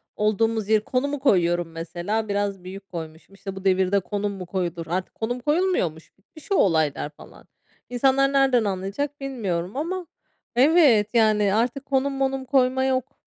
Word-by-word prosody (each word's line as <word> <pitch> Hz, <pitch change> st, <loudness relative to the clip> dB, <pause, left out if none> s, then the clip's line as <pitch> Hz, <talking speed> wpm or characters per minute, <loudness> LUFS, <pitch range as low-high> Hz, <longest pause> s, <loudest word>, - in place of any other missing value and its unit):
olduğumuz 215 Hz, 0 st, 0 dB
yeri, 215 Hz, -1 st, +3 dB
konumu 280 Hz, +5 st, -1 dB
koyuyorum 175 Hz, -, +2 dB
mesela. 175 Hz, +7 st, -3 dB
Biraz 200 Hz, -2 st, -2 dB
büyük 195 Hz, +2 st, -9 dB
koymuşum. 160 Hz, +2 st, -8 dB
İşte, 195 Hz, -1 st, -7 dB
"Bu 190 Hz, 0 st, -9 dB
devirde 190 Hz, +1 st, +3 dB
konum 205 Hz, +2 st, -3 dB
mu 185 Hz, -2 st, -7 dB
koyulur?" 175 Hz, -2 st, -3 dB
Artık 180 Hz, +2 st, -3 dB
konum 240 Hz, +3 st, -3 dB
koyulmuyormuş, 295 Hz, -, -1 dB
bitmiş 310 Hz, -, -18 dB
o -, -, +4 dB
olaylar 160 Hz, -, +2 dB
falan. 150 Hz, -, -16 dB, 0.4 s
İnsanlar 270 Hz, +2 st, +2 dB
nereden 265 Hz, -4 st, +4 dB
anlayacak 205 Hz, +9 st, -3 dB
bilmiyorum 200 Hz, -7 st, -3 dB
ama 345 Hz, +3 st, -3 dB, 0.5 s
Evet, 255 Hz, -6 st, +5 dB
yani, 215 Hz, -3 st, +3 dB
artık 245 Hz, +5 st, 0 dB
konum 275 Hz, 0 st, 0 dB
monum 270 Hz, -1 st, -1 dB
koyma 260 Hz, -1 st, +2 dB
yok, 260 Hz, 0 st, -1 dB
215 Hz, 150 wpm, -24 LUFS, 185-265 Hz, 0.5 s, Evet